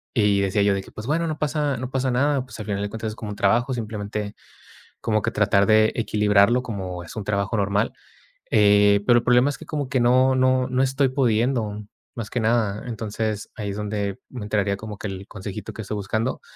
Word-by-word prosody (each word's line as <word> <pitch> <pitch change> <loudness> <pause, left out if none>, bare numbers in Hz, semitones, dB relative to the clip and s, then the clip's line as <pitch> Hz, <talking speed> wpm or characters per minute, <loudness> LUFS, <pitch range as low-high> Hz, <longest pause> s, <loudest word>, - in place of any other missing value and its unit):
y 105 -3 +3
decía 100 +1 +1
yo 100 0 +3
de 95 - -2
que - - -15
pues 110 +3 -8
bueno, 165 +3 +1
no 155 -1 -4
pasa 150 -2 0
no 130 +1 -5
pasa 130 -1 0
nada, 135 +1 +1
pues 125 - -11
al 105 - -5
final 100 -1 -2
de 105 - -3
cuentas 110 +1 -4
es 110 - -7
como 105 -2 -6
un - - -6
trabajo, 120 +7 +2
simplemente 105 -2 -4 0.7
como 110 -1 +1
que - - 0
tratar 100 -1 +3
de 110 +1 +4
equilibrarlo 105 +2 +3
como 95 -7 -5
es 85 - -11
un 110 - -4
trabajo 100 +1 -1
normal, 100 +2 +1 0.6
eh, 105 -1 +5
pero 120 -1 +5
el - - -7
problema 125 +3 +4
es - - -7
que - - -10
como 145 -4 -3
que 130 -3 +1
no 130 +2 +4
no 130 0 +3
no 130 0 0
estoy 135 0 +2
pudiendo 115 -4 0 0.3
más 115 -1 -5
que 125 - -1
nada. 110 -2 +1
Entonces 110 -1 -3
ahí 105 -3 -4
es 100 - -4
donde 105 -2 -3
me 125 - -7
entraría 105 -1 0
como 105 0 -8
que 105 - -8
el 95 +1 -7
consejito 105 +1 -7
que 110 - -6
estoy 105 - -5
buscando, 110 +5 -2
110 Hz, 220 wpm, -23 LUFS, 100-125 Hz, 0.7 s, eh